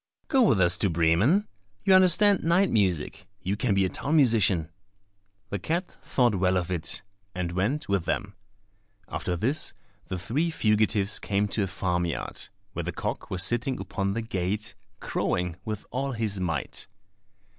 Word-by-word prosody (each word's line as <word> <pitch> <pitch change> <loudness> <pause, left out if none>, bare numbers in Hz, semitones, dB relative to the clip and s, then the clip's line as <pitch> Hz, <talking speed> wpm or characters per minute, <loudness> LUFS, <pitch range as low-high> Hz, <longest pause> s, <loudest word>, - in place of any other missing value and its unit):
"Go 270 -4 +4
with 135 - +4
us 90 -1 +4
to 100 - +2
Bremen. 85 - +3 0.4
You 190 - +4
understand 185 +2 +5
night 175 +4 +3
music, 95 -8 0 0.2
you 95 +3 -1
can 105 -1 0
be 95 -1 +3
a - - -1
town 145 - -2
musician." 105 - +3 0.8
The 100 - -2
cat 170 - -3
thought 120 -4 +2
well 95 -1 +2
of 90 0 -2
it, 85 -2 -2 0.3
and 90 -1 -2
went 105 - -1
with 100 -4 0
them. 100 0 -2 0.7
After 90 - -3
this 130 - +1 0.3
the 95 - -3
three 120 - -1
fugitives 105 -7 +2
came 100 0 0
to 105 - 0
a 100 - 0
farm 90 -1 -1
yard, 80 - -5 0.2
where - - -3
the - - -3
cock - - -4
was 95 -1 +1
sitting 120 +5 0
upon 100 0 -2
the 115 +2 -2
gate, 105 +1 -2 0.3
crowing 90 -1 -2
with 110 -2 -4
all 135 +2 -2
his 110 -4 -2
might. 80 -7 -3
100 Hz, 165 wpm, -27 LUFS, 90-130 Hz, 0.8 s, understand